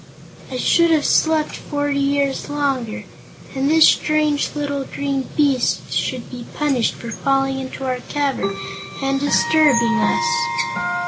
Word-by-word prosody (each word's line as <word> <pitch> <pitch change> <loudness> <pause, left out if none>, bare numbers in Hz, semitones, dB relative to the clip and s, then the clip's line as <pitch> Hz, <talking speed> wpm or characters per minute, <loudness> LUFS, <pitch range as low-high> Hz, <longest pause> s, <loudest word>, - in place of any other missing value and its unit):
"I 255 - -3
should 335 +6 +3
have 315 -3 +2
slept 315 -1 +2
forty 290 -1 -2
years 280 -1 0
longer. 275 -6 -2 0.5
And 270 +1 0
this 320 0 +6
strange 305 -1 +1
little 285 -2 -2
green 275 -1 -3
beast 280 -4 +1
should 255 -3 -2
be 245 -2 -8
punished 275 -6 0
for 235 - -8
falling 270 +2 0
into 265 0 -6
our 255 -1 -2
cavern 270 -9 -1 0.5
and 275 0 0
disturbing 285 -5 +3
us." 105 - +1
275 Hz, 130 wpm, -20 LUFS, 255-295 Hz, 0.5 s, this